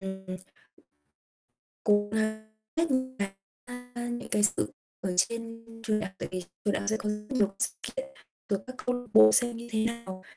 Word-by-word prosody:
ừm, 190 0 -6 1.6
cố 205 0 +4
gắng 220 0 0 0.3
hết 330 -2 +3
những 260 0 0
cái, 200 -1 +1 0.4
a, 245 0 -9
những 240 +1 -3
cái 210 - +3
sự 105 - +3 0.3
ở 180 -1 -1
trên 230 +2 0 0.2
trường 215 -1 +2
đại 215 - -2
học 195 - -23
tại - - -3
vì 185 0 -2 0.2
trường 205 - +4
đại - - 0
học 205 - 0
sẽ 220 - +2
có 210 - -2
rất 210 0 -2
nhiều 235 -7 +4
cái 195 - -14
sự - - +2
kiện, - - -3 0.4
rồi 200 -2 +2
các 255 - -7
câu 250 0 +2
lạc 245 0 -6
bộ 110 0 +10
xem 240 - +4
như 235 +1 -7
thế 220 0 +2
nào. 230 -5 -3
220 Hz, 210 wpm, -30 LUFS, 200-240 Hz, 1.6 s, bộ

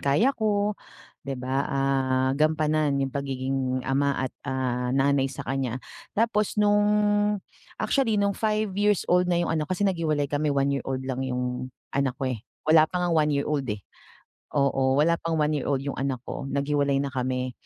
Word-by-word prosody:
kaya 150 - +3
ko, 210 -3 +1 0.6
'di 135 - -2
ba, 130 +1 -3
ah, 135 -1 +1
gampanan 155 0 +2
yung 135 - -5
pagiging 130 -2 -2
ama 140 +1 +1
at, 130 -1 -2 0.2
ah, 125 -1 -1
nanay 135 0 +3
sa 130 - -7
kanya. 135 -3 -2 0.4
Tapos 215 -2 +1
nung 205 0 +4 0.9
actually 250 -6 +1
nung 200 0 +2
five-years-old 205 -4 +1
na 175 - +2
yung - - -1
anak 155 0 -1
ko, 185 - -1
kasi 205 - 0
naghiwalay 160 -6 +1
kami 145 +2 -1
one-year-old 140 -2 0
lang 130 -1 -3
yung 125 -1 -2 0.2
anak 135 -2 0
ko 130 -1 -1
eh, 115 - -6 0.2
wala 155 0 +6
pa 180 - -4
ngang 175 - +1 0.2
one-year-old, 140 -2 -1
eh. 105 -2 -5 0.7
Oo, 135 -1 +2
wala 165 +4 +4
pang 165 -1 -1
one-year-old 150 -3 0
yung 140 - -3
anak 135 -2 -1
ko, 135 - -5
naghiwalay 140 0 +1
na 140 - -1
kami. 130 0 -2
140 Hz, 160 wpm, -26 LUFS, 130-165 Hz, 0.9 s, wala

